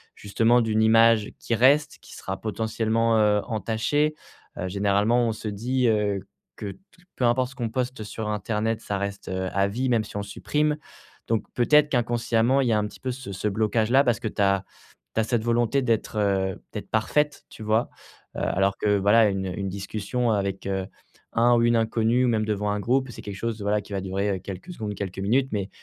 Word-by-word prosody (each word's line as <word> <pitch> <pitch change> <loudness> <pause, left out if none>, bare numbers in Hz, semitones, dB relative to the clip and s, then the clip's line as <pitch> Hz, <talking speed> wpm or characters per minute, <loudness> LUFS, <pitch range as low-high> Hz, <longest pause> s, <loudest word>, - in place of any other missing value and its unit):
justement, 115 +4 +2
d'une 110 -1 +1
image 115 -1 +5
qui 115 - -3
reste, 140 +6 +3
qui - - -13
sera 95 0 -5
potentiellement, 110 +1 0
heu, 105 -1 +3
entachée. 115 +8 0 0.4
Heu, 95 - -3
généralement, 100 +5 +2
on - - -1
se 110 - -7
dit, 120 +5 0
heu, 105 -2 +1 0.4
que 100 - -5
t - - -23 0.4
peu - - -3
importe 125 +2 +2
ce - - -15
qu'on 120 -4 -3
poste 125 -1 -3
sur 110 +1 -5
internet, 105 +2 -1
ça 100 - -3
reste, 100 0 -5
heu, 95 0 -2
à 100 0 +2
vie, 125 +6 -2
même 115 -3 +2
si 105 - -7
on 100 - -2
supprime, 150 +9 -1 0.5
donc 115 -1 0
peut-être 150 +5 +4
qu'inconsciemment, 120 0 +1
il 130 - 0
y - - +3
a - - +3
un 105 - 0
petit - - -14
peu 130 - -2
ce 125 -5 -7
ce 95 +3 -2
blocage 110 +1 0
là 135 +2 +6
parce 120 -4 +1
que - - -3
tu 105 - -3
as 100 -1 +2 0.5
tu - - +1
as - - -1
cette 115 -1 0
volonté 120 +3 +1
d'être, 115 -3 -1
heu, 95 -2 0
d'être - - -6
parfaite, 145 +7 0
tu 110 - -10
vois? 110 +2 +1 0.5
Heu, - - -3
alors 95 +1 +1
que, 105 -1 +2
voilà, 105 +3 +5
une 95 -1 -2
une 95 +2 -3
discussion 105 +5 -2
avec, 100 -2 -2
heu, 95 -1 -2 0.5
un 120 +1 +4
ou 115 - +3
une 120 0 +3
inconnue, 115 +2 +2
ou - - +2
même 110 -2 +1
devant 105 -1 -1
un 105 - -1
groupe, 130 +3 +1
c'est - - -10
quelque 100 -1 -6
chose, 115 -1 -3
voilà, 105 +1 +1
qui - - -16
va 100 - -1
durer, 95 +2 -1
heu, - - -9
quelques 95 - -8
secondes, 105 -8 -5
quelques 95 -1 -5
minutes, 125 +7 +1
mais 100 -1 -2
110 Hz, 215 wpm, -25 LUFS, 100-120 Hz, 0.5 s, là